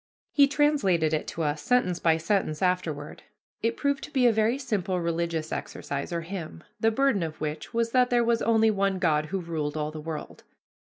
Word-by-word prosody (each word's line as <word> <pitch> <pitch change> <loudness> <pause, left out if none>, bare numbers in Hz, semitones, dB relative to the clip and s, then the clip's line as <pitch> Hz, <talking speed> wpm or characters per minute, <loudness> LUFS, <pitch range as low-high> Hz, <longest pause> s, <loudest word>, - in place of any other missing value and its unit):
He 280 -1 +5
translated 240 - +2
it 155 - -1
to 165 - -3
us, 150 0 -1
sentence 185 -9 +1
by 160 -1 +3
sentence, 165 -2 -1
afterward. 165 -5 -1 0.4
It 230 +1 0
proved 280 -1 0
to - - -14
be 265 -3 +2
a 240 - +7
very 220 +3 +2
simple 195 -8 -1
religious 170 -1 -2
exercise 140 +4 -4
or 170 -1 -1
hymn, 165 - -7 0.2
the 225 - +3
burden 250 -3 +2
of 160 -2 -4
which 150 0 -4
was 230 -1 0
that 250 0 +4
there 240 -1 +3
was 230 0 +1
only 225 -1 +4
one 195 -1 0
God 155 -4 +1
who 195 +4 -2
ruled 155 -3 -3
all 150 0 -2
the 155 0 -7
world. 155 -1 -7
180 Hz, 195 wpm, -27 LUFS, 160-230 Hz, 0.4 s, a